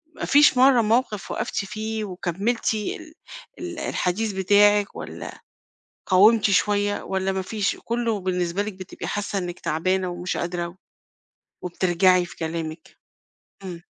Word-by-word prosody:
ما - - -4
فيش 290 -2 +5
مرّة 255 -1 +6
موقف 220 -1 0
وقفتِ - - -3
فيه 215 +2 -4
وكمِّلتِ 195 +6 -1
ال 315 - -5 0.5
ال 345 -1 -6
الحديث 215 - -1
بتاعِك 205 +2 +3
والّا - - -8 0.7
قاومتِ 210 +3 +5
شوية 205 +2 +1
والّا 190 0 -1
ما 190 0 -2
فيش 205 +1 -1
كُلّه 230 -3 -1
بالنسبة 180 0 -1
لِك 210 +1 -5
بتبقي 185 -1 -8
حاسّة 205 -1 -2
إنِّك 175 -1 -5
تعبانة 185 +3 0
ومش 175 +1 -4
قادرة 175 0 -3 0.9
وبترجعي 180 0 +2
في - - -12
كلامِك؟ 160 -1 -5 0.7
إمم. 175 -3 -7
195 Hz, 130 wpm, -24 LUFS, 180-220 Hz, 0.9 s, مرّة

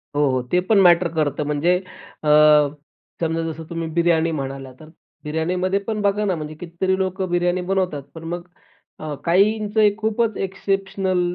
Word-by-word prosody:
हो, 145 - +2
हो, 130 0 0
ते 180 - +4
पण 215 - +5
मॅटर 175 -1 +5
करतं. 150 -2 0
म्हणजे 150 +5 +2 0.5
अ, - - -3 0.9
समजा 165 0 0
जसं 160 +1 -8
तुम्ही 165 -1 -4
बिर्याणी 165 -1 +2
म्हणाला, 135 -3 -5
तर 155 - -13 0.3
बिर्याणीमध्ये 180 +5 -1
पण 215 -1 -2
बघा 205 +1 +1
ना 190 -3 +1
म्हणजे 155 -1 -6
कितीतरी 180 +2 -1
लोकं 190 0 -2
बिर्याणी 175 +1 +1
बनवतात. 180 -6 -1
पण 160 - -9
मग 175 0 -6 0.5
अ, 155 -1 -5
काहींचं 210 +4 +3
खूपच 220 0 0
एक्सेप्शनल 195 -1 -1
175 Hz, 155 wpm, -21 LUFS, 160-195 Hz, 0.9 s, पण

